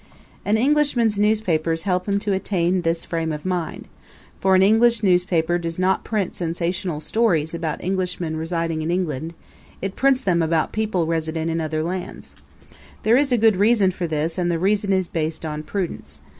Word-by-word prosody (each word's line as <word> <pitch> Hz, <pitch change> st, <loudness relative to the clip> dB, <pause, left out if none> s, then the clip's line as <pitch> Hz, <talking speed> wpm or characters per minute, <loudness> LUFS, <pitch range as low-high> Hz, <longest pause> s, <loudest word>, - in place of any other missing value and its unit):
An 210 Hz, +2 st, +2 dB
Englishman's 250 Hz, -5 st, +2 dB
newspapers 170 Hz, -7 st, +1 dB
help 185 Hz, -1 st, -1 dB
him 200 Hz, -, +2 dB
to 205 Hz, -1 st, -1 dB
attain 185 Hz, -2 st, 0 dB
this 165 Hz, 0 st, -1 dB
frame 165 Hz, -1 st, -2 dB
of 150 Hz, +1 st, -6 dB
mind; 180 Hz, -3 st, -3 dB, 0.5 s
for 190 Hz, 0 st, +3 dB
an 185 Hz, -, +5 dB
English 225 Hz, +2 st, +4 dB
newspaper 175 Hz, -2 st, +2 dB
does 165 Hz, -1 st, -4 dB
not 185 Hz, +1 st, +1 dB
print 205 Hz, -5 st, -2 dB
sensational 170 Hz, -1 st, -2 dB
stories 165 Hz, -3 st, +1 dB
about 165 Hz, -2 st, -3 dB
Englishmen 180 Hz, -3 st, -2 dB
residing 165 Hz, 0 st, -2 dB
in 155 Hz, -, -3 dB
England; 165 Hz, -3 st, -2 dB, 0.4 s
it 195 Hz, 0 st, -4 dB
prints 270 Hz, -1 st, +3 dB
them 180 Hz, -7 st, +1 dB
about 160 Hz, -1 st, +1 dB
people 215 Hz, -6 st, 0 dB
resident 160 Hz, 0 st, -2 dB
in 165 Hz, 0 st, -1 dB
other 155 Hz, 0 st, -2 dB
lands. 180 Hz, +2 st, -5 dB, 0.7 s
There 225 Hz, +2 st, +4 dB
is 275 Hz, +1 st, +2 dB
a 245 Hz, -, +4 dB
good 220 Hz, -3 st, +4 dB
reason 205 Hz, -1 st, +4 dB
for 175 Hz, -1 st, -4 dB
this 160 Hz, +2 st, -2 dB
and 175 Hz, -1 st, 0 dB
the 170 Hz, -, +1 dB
reason 200 Hz, +3 st, +1 dB
is 190 Hz, -2 st, +1 dB
based 160 Hz, 0 st, -3 dB
on 150 Hz, -1 st, -4 dB
prudence. 155 Hz, -, -5 dB
180 Hz, 175 wpm, -22 LUFS, 165-200 Hz, 0.7 s, an